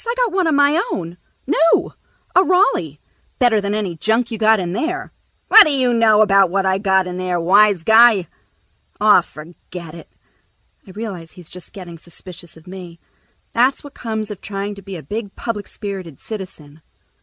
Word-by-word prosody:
I 470 - -1
got - - +1
one 375 -2 0
of 315 - +2
my 290 +5 +3
own. 175 -1 -5 0.3
New. 330 +3 +2 0.4
A 370 - +6
Raleigh. 270 - +1 0.4
Better 235 -4 +2
than 200 +1 -2
any 200 -5 -3
junk 225 +7 0
you 225 - -5
got 220 -1 +4
in 175 -1 -4
there." 330 - -4 0.3
"What 440 -2 +9
d'you 265 -5 +1
know 220 -2 +4
about 195 -3 +3
what 195 +2 -1
I 190 0 +1
got 190 -2 +2
in 180 0 -6
there, 180 -1 -2
wise 195 +1 +3
guy?" 220 -2 +5 0.7
"Aw, 210 -3 +5
forget 170 +1 -12
it." 170 - -12 0.8
I - - -14
realize 190 -5 -8
he's 180 -3 -14
just 180 -1 -13
getting 175 -4 -10
suspicious 170 0 -10
of 160 - -18
me. 180 -2 -11 0.5
That's 250 +3 +1
what 285 -1 -12
comes 220 -2 -5
of 200 - -9
trying 200 0 -5
to 200 - -12
be 195 0 -9
a 165 - -9
big 205 - -6
public 215 -3 -5
spirited 190 - -7
citizen. 170 -8 -10
200 Hz, 180 wpm, -18 LUFS, 180-230 Hz, 0.8 s, What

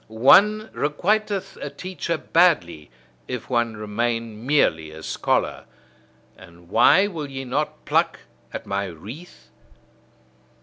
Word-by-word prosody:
One 195 - +4
requiteth 195 +6 -1
a - - -4
teacher 180 -2 -4
badly 150 - +2 0.4
if 125 0 -6
one 120 -2 0
remain 115 +1 -3
merely 100 - +2
a 80 +1 -11
scholar. - - -1 0.7
And 85 -1 -17
why 120 - +5
will 160 -8 -5
ye 135 0 -6
not 145 +5 -3
pluck - - +1 0.3
at - - -6
my 100 0 -2
wreath? 105 - -11
125 Hz, 115 wpm, -23 LUFS, 105-175 Hz, 0.7 s, why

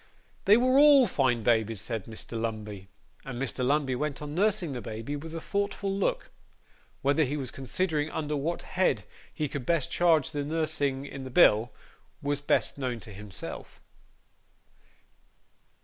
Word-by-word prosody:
'They 205 +2 +7
were 255 +2 +4
all 290 -3 +8
fine 130 - +1
babies,' 110 -2 +2
said 110 0 -4
Mr. 110 -1 -8
Lumbey. 110 -4 -4 0.4
And 125 -3 -6
Mr. 130 -1 -2
Lumbey 135 0 +1
went 145 +1 -2
on 150 0 -6
nursing 190 -2 +1
the 125 -3 -4
baby 115 +7 -5
with 160 +3 -7
a - - -3
thoughtful 200 +1 -2
look. 200 - -1 0.7
Whether 145 +3 +3
he 145 +2 -1
was 130 -4 -5
considering 150 +3 -1
under 150 -1 -2
what 155 +5 -2
head 185 0 +1 0.3
he 155 - -2
could 140 -1 -5
best 165 0 0
charge 165 -5 +3
the 145 -1 -2
nursing 145 -3 -1
in 135 -1 -7
the 130 - -6
bill, 120 -6 +5 0.5
was 145 0 -2
best 145 - +1
known 125 -3 -2
to 105 - -9
himself. 100 -1 -7
145 Hz, 155 wpm, -28 LUFS, 120-165 Hz, 0.7 s, all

